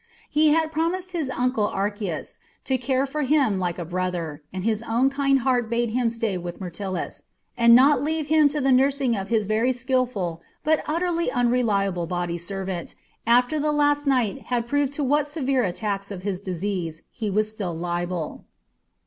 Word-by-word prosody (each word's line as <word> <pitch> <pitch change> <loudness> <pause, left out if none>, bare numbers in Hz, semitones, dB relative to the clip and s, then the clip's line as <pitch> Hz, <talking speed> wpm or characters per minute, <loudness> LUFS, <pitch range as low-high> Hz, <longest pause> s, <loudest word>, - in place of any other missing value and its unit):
He 305 +1 +4
had 315 +1 +3
promised 345 +4 -1
his 325 -6 -2
uncle 250 -4 +1
Archias 200 -4 -3 0.3
to 260 -1 0
care 260 +1 +1
for 295 +2 -3
him 270 -8 +2
like 175 -2 -2
a 175 - -4
brother, 175 -3 -3
and 185 0 -5
his 220 0 0
own 250 +4 +3
kind 275 -1 +2
heart 245 -2 +1
bade 235 0 0
him 240 0 +1
stay 225 -5 -2
with 175 0 -6
Myrtilus, 185 0 -5 0.3
and 235 -1 +7
not 270 +1 +6
leave 310 +1 -1
him 305 0 +5
to 290 +1 -1
the 270 -1 +2
nursing 265 -1 +3
of 195 -1 -4
his 220 -2 +1
very 220 +5 +2
skilful 245 -10 -1 0.2
but 315 0 +2
utterly 340 +1 0
unreliable 210 -8 +1
body 175 -1 -2
servant, 190 0 -5 0.3
after 245 +5 +4
the 300 +1 +1
last 290 0 +2
night 255 -2 +1
had 240 -2 -1
proved 285 +1 +1
to 290 - -2
what 290 +2 +2
severe 275 -4 0
attacks 200 +1 -2
of 190 -3 -7
his 195 -2 -2
disease 180 -3 -3
he 220 -3 -3
was 215 +2 0
still 195 -6 -4
liable. 175 0 -3
235 Hz, 175 wpm, -24 LUFS, 190-275 Hz, 0.3 s, and